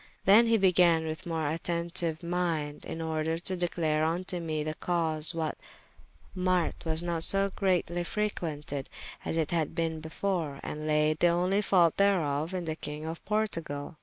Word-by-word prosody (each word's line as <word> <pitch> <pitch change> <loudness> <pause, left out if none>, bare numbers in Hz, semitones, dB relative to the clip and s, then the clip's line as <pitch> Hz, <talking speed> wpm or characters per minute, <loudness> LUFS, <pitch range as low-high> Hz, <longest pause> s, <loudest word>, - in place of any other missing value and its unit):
Then 215 +5 +7
he 230 0 +4
began 175 -4 +4
with 155 +2 -5
more 165 -1 -2
attentyue 170 +2 -1
mynde, 170 -4 -2
in 165 - -5
order 160 0 -1
to 185 +2 -2
declare 165 -3 0
vnto 175 +2 -2
me 155 -2 -2
the 155 0 -3
cause 165 -1 +1
why 160 -2 -1
that - - -8 0.8
marte 180 -3 0
was 160 +1 -1
not 170 -2 -2
so 195 +3 +5
greatly 175 -2 0
frequented 155 -9 -3 0.3
as 165 - -2
it 160 -2 0
had 165 -2 -1
been 165 -2 -1
before, 160 -2 -3
and 155 +1 -4
layde 150 +1 +2
the 175 - +5
only 180 +4 +2
faulte 180 -5 +3
thereof 165 -6 +2
in 180 -2 -3
the 160 -1 -2
Kyng 150 0 -5
of 165 +1 -6
Portugale. 165 -8 -2
165 Hz, 165 wpm, -29 LUFS, 155-180 Hz, 0.8 s, Then